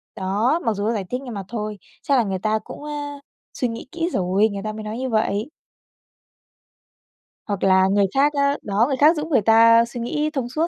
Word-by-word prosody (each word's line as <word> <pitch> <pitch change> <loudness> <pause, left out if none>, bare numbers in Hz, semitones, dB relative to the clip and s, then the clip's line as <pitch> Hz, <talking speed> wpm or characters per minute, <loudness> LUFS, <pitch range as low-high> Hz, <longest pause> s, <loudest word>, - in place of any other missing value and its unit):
Đó, 210 - 0
mặc 225 - +2
dù 200 0 -4
nó 230 - +1
giải 205 -3 -2
thích 250 +2 -3
nhưng 245 -3 -7
mà 200 -1 -5
thôi, 215 -3 -5 0.3
chắc 280 -2 +2
là 240 - +3
người 190 -2 -3
ta 215 +2 0
cũng, - - -10
ơ, 300 - -6 0.6
suy 250 - -1
nghĩ 230 +2 -7
kỹ 335 0 -2
rồi, 195 +4 +2
người 200 0 -6
ta 215 0 -4
mới 215 0 -7
nói 215 +2 -5
như 260 0 -3
vậy. 215 +3 -1 2.0
Hoặc 200 -2 -3
là 190 0 +4
người 200 0 +3
khác 285 +2 +3
á, 280 0 +1
đó, 210 +3 +1
người 270 -2 -1
khác 310 +5 +5
giúp 300 +1 -3
người 260 -9 +2
ta 230 +2 +6
suy 240 +1 -8
nghĩ 300 +6 -1
thông 250 -4 -2
suốt 320 +6 0
230 Hz, 225 wpm, -22 LUFS, 205-270 Hz, 2.0 s, ta